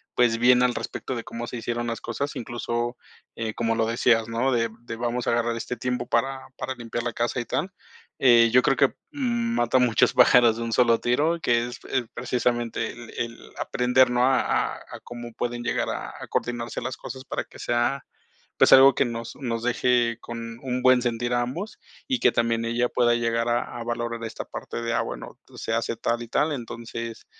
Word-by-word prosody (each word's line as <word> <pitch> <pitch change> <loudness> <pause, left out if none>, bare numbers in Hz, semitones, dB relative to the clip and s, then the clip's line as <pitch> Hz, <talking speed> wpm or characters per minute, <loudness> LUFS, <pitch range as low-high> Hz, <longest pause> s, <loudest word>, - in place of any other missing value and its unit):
pues, 120 -2 +3
bien 125 +1 +5
al 125 -1 +3
respecto 130 - -4
de 115 - -5
cómo 115 0 -6
se 125 - -5
hicieron 120 +1 -3
las 115 - -3
cosas, 140 +5 -4
incluso, 120 +1 -3 0.4
eh, 110 -1 -3
como 115 0 0
lo 115 0 +1
decías, 115 -1 +2
¿no?, 120 +4 +1
de 115 -1 +1
de 120 - -6
vamos 120 +1 -2
a - - +3
agarrar 120 0 +1
este 120 +2 -4
tiempo 125 0 -2
para 135 +1 -1
para 130 - -4
limpiar 120 -1 -4
la 120 - -1
casa 120 +2 -1
y - - -7
tal. 180 +10 -2 0.5
Eh, 120 -3 +6
yo 125 - +7
creo 135 - +2
que, 140 - +5 0.2
mm, 235 -4 -1
mata 120 +2 +3
muchos 120 -4 +3
pájaros 120 -3 +6
de 115 - -3
un 115 - -3
solo 115 -2 +4
tiro, 150 +8 +1
que 120 -4 +2
es 120 - -8
es 130 -2 0
precisamente 120 -2 -1
el 120 -1 -11
el 115 -1 -5
aprender, 125 +1 +3
¿no?, 125 0 +2
a 135 0 +4
a - - 0
a - - -11
cómo 120 -1 -8
pueden 120 +1 -3
llegar - - -1
a - - -4
a - - -8
coordinarse 120 -1 -2
las 130 +2 -4
cosas 130 0 -8
para - - -3
que - - -16
sea, 120 +3 0 0.5
pues, - - +5
algo 135 0 +9
que - - +2
nos 115 -1 -5
nos 115 -4 -3
deje 120 -1 +2
con 115 -1 -7
un 125 -1 -2
buen 130 0 +6
sentir 120 0 -1
a 120 - +2
ambos 165 - -5 0.3
y 260 -2 0
que - - +5
también 115 -1 +1
ella 120 +1 +1
pueda 120 -1 +3
llegar 115 0 0
a 120 0 -1
a 115 - -5
valorar 120 0 -3
esta 110 - -5
parte 115 - -6
de 115 0 -1
a - - +2
bueno, - - -7 0.2
se 110 - -4
hace 115 0 -1
tal 120 +1 -1
y 115 - -8
tal, 150 +6 +1
entonces, 115 -2 -6
120 Hz, 210 wpm, -25 LUFS, 115-125 Hz, 0.5 s, algo